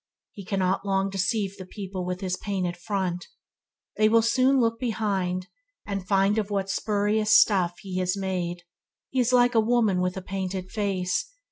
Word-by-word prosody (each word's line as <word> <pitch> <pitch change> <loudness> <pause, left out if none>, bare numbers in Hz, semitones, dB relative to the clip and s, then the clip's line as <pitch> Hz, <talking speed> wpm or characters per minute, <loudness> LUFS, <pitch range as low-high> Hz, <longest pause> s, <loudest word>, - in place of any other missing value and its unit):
He 200 - -10
cannot 190 0 0
long 195 -1 0
deceive 195 +1 -1
the 185 - -8
people 190 -2 -6
with 180 +1 -4
his 185 -2 -1
painted 185 -3 -3
front. 180 -1 -3 0.7
They 215 0 +4
will 230 0 +4
soon 260 +4 +3
look 230 -1 +1
behind, 200 -6 -1 0.4
and 195 -3 -4
find 195 +2 +3
of 210 -1 -3
what 195 -1 -1
spurious 210 +1 0
stuff 180 -4 +2
he 185 -1 -3
is 180 +2 0
made. 180 -2 -3 0.5
He 260 - 0
is 250 0 +2
like 245 0 +4
a 225 - +4
woman 220 -5 +2
with 180 +1 -1
a 190 - -5
painted 190 -1 -4
face. 200 - -1
195 Hz, 170 wpm, -26 LUFS, 185-215 Hz, 0.7 s, They